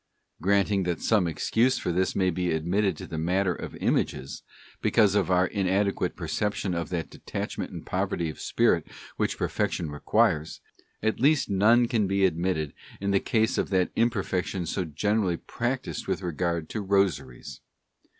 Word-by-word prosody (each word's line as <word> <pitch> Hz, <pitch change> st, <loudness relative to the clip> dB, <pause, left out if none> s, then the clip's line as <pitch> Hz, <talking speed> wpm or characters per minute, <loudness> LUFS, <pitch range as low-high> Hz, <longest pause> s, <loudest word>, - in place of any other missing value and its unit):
Granting 100 Hz, +2 st, +2 dB
that 90 Hz, -2 st, -1 dB
some 105 Hz, -6 st, +2 dB
excuse 115 Hz, -, +1 dB
for -, -, -2 dB
this 95 Hz, +2 st, 0 dB
may 95 Hz, -1 st, +2 dB
be 90 Hz, +1 st, -1 dB
admitted 90 Hz, +3 st, 0 dB
in -, -, -7 dB
the 80 Hz, -, -4 dB
matter 90 Hz, +3 st, +1 dB
of -, -, -7 dB
Images, 70 Hz, -, -1 dB, 0.4 s
because 105 Hz, -4 st, +4 dB
of 100 Hz, -3 st, +1 dB
our 90 Hz, 0 st, +4 dB
inadequate 95 Hz, -1 st, 0 dB
perception 95 Hz, +3 st, -2 dB
of 85 Hz, -1 st, -3 dB
that 85 Hz, -3 st, -3 dB
detachment -, -, -5 dB
and -, -, -8 dB
poverty 85 Hz, -, -1 dB
of 75 Hz, -, -7 dB
spirit -, -, +2 dB, 0.3 s
which -, -, 0 dB
perfection 80 Hz, -4 st, -1 dB
requires, 80 Hz, +1 st, +1 dB, 0.4 s
at 110 Hz, 0 st, 0 dB
least 140 Hz, -3 st, +3 dB
none 115 Hz, +5 st, +5 dB
can 110 Hz, -4 st, +1 dB
be 100 Hz, 0 st, +2 dB
admitted 85 Hz, -4 st, 0 dB, 0.3 s
in 100 Hz, 0 st, -1 dB
the 100 Hz, -, +4 dB
case 110 Hz, 0 st, +1 dB
of; -, -, -1 dB
that 95 Hz, -2 st, +1 dB
imperfection 95 Hz, -5 st, 0 dB
so 90 Hz, +3 st, -2 dB
generally 95 Hz, +3 st, 0 dB
practised 125 Hz, +7 st, -3 dB
with -, -, -2 dB
regard 85 Hz, -1 st, -1 dB
to 110 Hz, -, -3 dB
Rosaries. 75 Hz, -10 st, -1 dB
95 Hz, 160 wpm, -27 LUFS, 85-105 Hz, 0.4 s, none